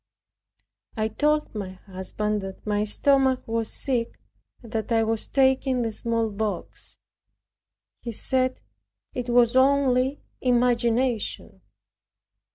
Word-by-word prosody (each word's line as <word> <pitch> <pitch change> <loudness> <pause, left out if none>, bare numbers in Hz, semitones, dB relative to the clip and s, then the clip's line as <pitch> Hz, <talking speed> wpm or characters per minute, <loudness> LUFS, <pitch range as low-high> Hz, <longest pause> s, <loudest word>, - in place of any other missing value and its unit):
I 215 0 0
told 300 +6 0
my 195 -4 -5
husband 200 +3 -4
that 190 0 -8
my 210 0 0
stomach 265 +3 +2
was 225 -1 -1
sick, 240 -4 +1 0.4
and 230 - -12
that 220 0 -3
I 225 -1 +3
was 225 0 -1
taking 265 -2 +2
the 225 - -1
smallpox. 220 -3 -2 1.0
He 235 - -5
said 255 +3 0 0.5
it 245 -1 -4
was 240 0 +4
only 265 0 +3 0.2
imagination. 245 -1 +1
235 Hz, 105 wpm, -25 LUFS, 215-260 Hz, 1.0 s, was